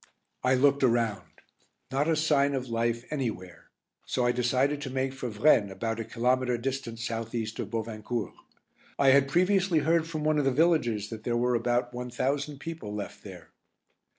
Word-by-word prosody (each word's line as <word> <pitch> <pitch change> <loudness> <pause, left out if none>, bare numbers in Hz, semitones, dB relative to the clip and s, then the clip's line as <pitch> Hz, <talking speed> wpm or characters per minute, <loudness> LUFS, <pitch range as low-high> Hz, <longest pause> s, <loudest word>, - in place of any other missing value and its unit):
I 130 +1 +4
looked 140 +2 +3
around. 115 -5 +1 0.6
Not 140 +3 +1
a 165 - +3
sign 145 -3 +2
of 130 -2 -4
life 115 +1 -1
anywhere, 110 - -4 0.3
so 125 - -1
I 120 - +4
decided 130 +4 +1
to 140 - -4
make 130 0 -1
for 130 -2 -5
Vraignes 105 -2 +3
about 115 +4 -3
a - - -2
kilometre 125 +2 0
distant 130 -1 -4
south 115 0 -4
east 110 -1 -3
of - - -3
Bovincourt. 110 0 -4 0.6
I 140 - +5
had 140 +1 +5
previously 185 +2 +2
heard 165 +2 +2
from 155 -2 -4
one 155 0 +2
of 145 - 0
the 135 - +3
villagers 125 - +1
that 110 -1 -7
there 120 -1 0
were 125 +1 +1
about 120 +1 0
one 125 0 -5
thousand 140 +4 -2
people 150 -9 -6
left 105 - -7
there. 90 -5 -11
125 Hz, 180 wpm, -28 LUFS, 115-140 Hz, 0.6 s, I